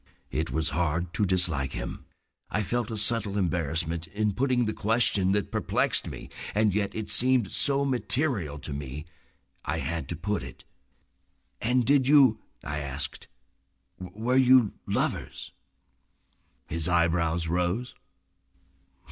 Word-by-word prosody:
It 80 +1 -2
was 80 -2 -1
hard 85 +3 -1
to 100 +2 +1
dislike 85 -7 0
him. - - -6 0.4
I 105 - -1
felt 120 +3 -2
a 110 - -4
subtle 105 -1 +1
embarrassment 85 -2 -1
in 105 0 -1
putting 125 +1 +1
the 110 - -1
question 105 -4 +3
that 105 -1 -1
perplexed - - +2
me. - - -8 0.3
And 105 -2 +3
yet 100 -1 -1
it 110 -1 -3
seemed 125 -5 +2
so 140 0 +4
material 125 - -1
to 75 - -6
me 70 +1 -6 0.6
I - - -2
had 80 0 -3
to - - -2
put - - -2
it. - - -10 1.0
"And 125 +1 +2
did 140 0 +3
you—?" 135 -7 +6 0.2
I 75 +1 -3
asked. 70 -1 -6 0.7
"Were 110 +8 -2
you—lovers?" 130 -4 +1 1.1
His 80 0 -3
eyebrows 85 -1 +1
rose. 90 +8 -1
100 Hz, 130 wpm, -27 LUFS, 80-120 Hz, 1.1 s, you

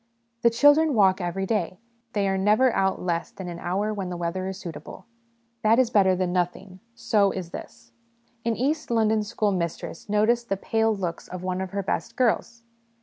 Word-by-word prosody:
' 235 0 -47
The 235 - +5
children 290 +5 +4
walk 190 -3 +4
every 180 +2 -2
day; 185 -4 -1 0.4
they 200 -2 +1
are 195 - +1
never 215 +6 +3
out 190 0 +1
less 170 -2 -2
than 190 - -9
an 170 -1 -6
hour 200 +5 -1
when 195 -3 -4
the 175 - -4
weather 175 +2 -3
is 190 0 -5
suitable.' 160 -5 -9 0.6
That 220 +1 +4
is 250 -2 +3
better 190 -4 +4
than 180 -1 -1
nothing; 180 +1 -2 0.2
so 205 -4 +2
is 185 -3 -5
this: - - -10 0.5
An 230 -1 0
East 295 +6 -1
London 220 -2 +2
school 210 0 -1
mistress 170 +1 -4
notices 225 +3 +2
the 195 -4 -2
pale 225 +3 +1
looks 175 -4 -4
of 180 0 -7
one 185 0 -2
of 190 - -4
her 200 +1 -3
best - - -3
girls. 235 -1 0
195 Hz, 195 wpm, -25 LUFS, 185-225 Hz, 0.6 s, The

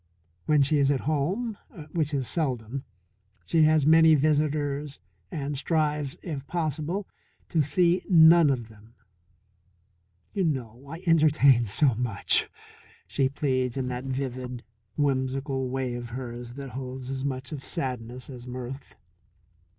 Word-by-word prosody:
When 150 -2 +5
she 145 +2 +2
is 140 -1 +3
at 140 -2 +1
home 185 - -1 0.3
which 155 -3 0
is 135 -4 -1
seldom 130 -5 -2 0.6
she 165 - +2
has 155 -2 +4
many 160 +1 +7
visitors 145 -1 0 0.3
and 145 -1 -3
strives, 150 -1 0
if 145 -6 -5
possible, 165 +4 -2 0.4
to 165 - +2
see 175 +4 +2
none 165 -2 +7
of 120 -5 -1
them. 110 +1 -18 1.4
"You 195 - 0
know, 130 -3 -3
I 165 +4 -8
entertain 150 -7 +5
so 125 +6 +3
much," 110 -3 0 0.6
she 135 -1 0
pleads 130 -2 -1
in 130 -1 -1
that 125 +1 -4
vivid, 130 -2 -4 0.3
whimsical 135 -1 0
way 130 -1 -2
of 120 -1 -6
hers 120 -1 -7
that 135 -2 -7
holds 130 0 -6
as 135 0 -3
much 130 -1 -3
of 145 -4 -6
sadness 125 -5 -4
as 125 -2 -10
mirth. 125 +2 -7
135 Hz, 135 wpm, -27 LUFS, 125-155 Hz, 1.4 s, many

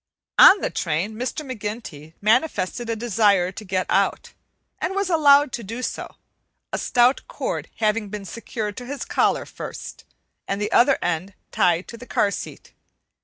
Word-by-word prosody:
On 395 - +9
the - - -1
train 170 +6 -1
Mr. 255 +7 -4
McGinty 210 - -7
manifested 235 -1 +1
a 230 - 0
desire 205 -5 +2
to 215 - -9
get 185 -2 -1
out, - - 0 0.5
and 385 - -2
was 395 -2 0
allowed 290 -3 +5
to 235 - -5
do 230 +5 -6
so, - - -5 0.6
a - - -1
stout 245 +2 +3
cord - - -4
having 215 -1 0
been 205 -1 -6
secured 215 -1 -5
to 245 - -7
his 285 +1 -5
collar - - +1
first, - - -8 0.4
and 195 - -2
the 210 +1 -2
other 265 +3 +5
end 175 +3 -2 0.2
tied 175 0 +2
to 230 - -8
the 245 +2 -12
car 205 - +1
seat. - - -8
220 Hz, 165 wpm, -23 LUFS, 195-250 Hz, 0.6 s, On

